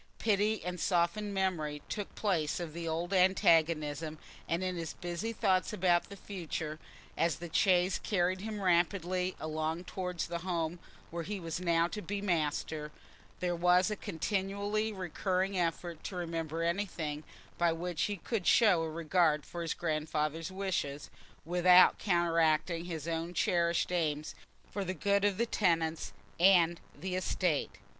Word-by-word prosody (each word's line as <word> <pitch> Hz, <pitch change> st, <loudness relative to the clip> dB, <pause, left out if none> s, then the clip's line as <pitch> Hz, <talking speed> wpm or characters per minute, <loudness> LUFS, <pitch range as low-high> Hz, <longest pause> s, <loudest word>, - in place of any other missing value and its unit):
Pity 215 Hz, -1 st, +1 dB
and 180 Hz, 0 st, -3 dB
softened 180 Hz, +4 st, +1 dB
memory 165 Hz, -7 st, -1 dB
took 205 Hz, -2 st, -5 dB
place 175 Hz, -8 st, 0 dB
of 170 Hz, -3 st, -5 dB
the 170 Hz, 0 st, -5 dB
old 170 Hz, +4 st, -2 dB
antagonism, 160 Hz, -4 st, +3 dB, 0.3 s
and 170 Hz, +3 st, -1 dB
in 185 Hz, -1 st, -1 dB
his 165 Hz, -2 st, -4 dB
busy 175 Hz, +6 st, -4 dB
thoughts 195 Hz, -4 st, +1 dB
about 175 Hz, -3 st, +2 dB
the 200 Hz, -, -8 dB
future, 165 Hz, -5 st, -5 dB, 0.4 s
as 165 Hz, -3 st, +1 dB
the 170 Hz, +2 st, -9 dB
chaise 185 Hz, -2 st, +3 dB
carried 185 Hz, -2 st, 0 dB
him 210 Hz, -1 st, -4 dB
rapidly 180 Hz, +1 st, +1 dB
along 155 Hz, +2 st, -2 dB
towards 180 Hz, -2 st, -3 dB
the 170 Hz, 0 st, -4 dB
home 170 Hz, -1 st, -2 dB, 0.3 s
where 170 Hz, +1 st, -3 dB
he 200 Hz, +4 st, -4 dB
was 165 Hz, -1 st, -4 dB
now 170 Hz, -1 st, +2 dB
to 210 Hz, -, -5 dB
be 200 Hz, +3 st, -3 dB
master, 155 Hz, -4 st, -1 dB, 0.5 s
there 175 Hz, -1 st, 0 dB
was 180 Hz, +3 st, +4 dB
a -, -, -1 dB
continually 200 Hz, +3 st, -2 dB
recurring 190 Hz, 0 st, -1 dB
effort 170 Hz, -1 st, -2 dB
to 190 Hz, -, -5 dB
remember 165 Hz, -2 st, -3 dB
anything 170 Hz, -4 st, -2 dB, 0.4 s
by 170 Hz, -1 st, +4 dB
which 170 Hz, 0 st, -3 dB
he 205 Hz, -1 st, -3 dB
could 195 Hz, +1 st, -3 dB
show 205 Hz, -8 st, +5 dB
a 165 Hz, -, -2 dB
regard 160 Hz, -1 st, +1 dB
for 175 Hz, -, -6 dB
his 165 Hz, -2 st, -2 dB
grandfather's 155 Hz, 0 st, -2 dB
wishes, 185 Hz, -7 st, -3 dB, 0.3 s
without 180 Hz, +2 st, +6 dB
counteracting 170 Hz, -2 st, +2 dB
his 165 Hz, -3 st, -5 dB
own 165 Hz, +1 st, -3 dB
cherished 170 Hz, -1 st, +1 dB
aims 155 Hz, -4 st, -1 dB, 0.4 s
for 200 Hz, -, -2 dB
the 185 Hz, 0 st, -3 dB
good 200 Hz, +3 st, +1 dB
of 205 Hz, -2 st, +2 dB
the 235 Hz, -, +2 dB
tenants 165 Hz, -7 st, 0 dB, 0.3 s
and 175 Hz, -2 st, +5 dB, 0.2 s
the 185 Hz, +3 st, -4 dB
estate. 180 Hz, -4 st, 0 dB
175 Hz, 150 wpm, -32 LUFS, 165-190 Hz, 0.5 s, without